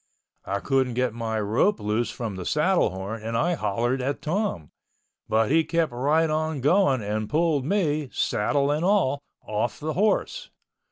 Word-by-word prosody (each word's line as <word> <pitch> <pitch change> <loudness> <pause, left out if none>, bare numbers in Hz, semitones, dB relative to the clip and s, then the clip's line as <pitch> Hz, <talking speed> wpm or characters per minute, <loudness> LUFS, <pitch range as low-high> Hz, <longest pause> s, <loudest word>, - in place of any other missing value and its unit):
I 100 +1 -2
couldn't 130 -3 +1
get 125 -2 0
my 115 -1 -2
rope 115 - +1
loose 105 +3 -1
from 110 -5 -5
the 95 - -5
saddle 160 - +2
horn 95 +4 -6
and 115 +1 -2
I 175 +7 +1
hollered 120 -1 -1
at 135 +2 -2
Tom—but 115 - -3
he 160 +1 +4
kept 165 -3 0
right 145 +7 +2
on 155 -1 -1
going 140 - +3
and 105 +1 -2
pulled 155 -3 +1
me—saddle 145 - 0
and 150 +3 0
all—off 140 - -1
the 155 +1 -3
horse. 215 - 0
135 Hz, 150 wpm, -25 LUFS, 110-160 Hz, -, he